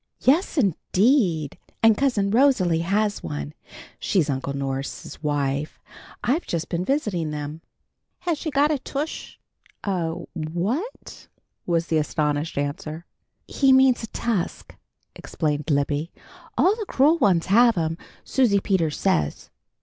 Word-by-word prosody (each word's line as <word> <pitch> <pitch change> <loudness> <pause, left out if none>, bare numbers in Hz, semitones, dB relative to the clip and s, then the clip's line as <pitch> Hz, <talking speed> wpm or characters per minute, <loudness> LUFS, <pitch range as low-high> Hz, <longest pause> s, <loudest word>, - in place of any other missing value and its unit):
"Yes, 320 +6 +2
indeed! 190 - +2 0.2
And 225 -1 +7
Cousin 210 -6 +1
Rosalie 220 -10 +3
has 205 +4 0
one. 75 -2 -5 0.5
She's 155 -7 +1
Uncle 135 +1 -3
Norse's 135 +1 -5
wife. 145 -1 -1 0.4
I've 290 +8 0
just 170 0 -3
been 170 +1 -1
visiting 195 - -1
them." 150 +1 -5 0.6
"Has 340 -4 -1
she 315 - -3
got 290 +1 +3
a 295 - 0
tush?" 285 +4 -5 0.5
"A 175 -5 -1 0.2
what?" 185 - -4 0.4
was 170 -1 +1
the 160 -2 +1
astonished 150 0 -1
answer. 155 +3 -4 0.4
"He 270 -2 +3
means 260 -3 +4
tusk," 225 -7 -3 0.4
explained 150 0 -3
Libby. 145 +2 0 0.5
"All 390 +3 +4
the 435 - -4
cruel 300 +5 +3
ones 185 - +3
have'm, 195 -7 +3 0.3
Susie 240 -7 +2
Peters 170 -6 0
says." 75 -1 0
175 Hz, 120 wpm, -24 LUFS, 150-255 Hz, 0.6 s, And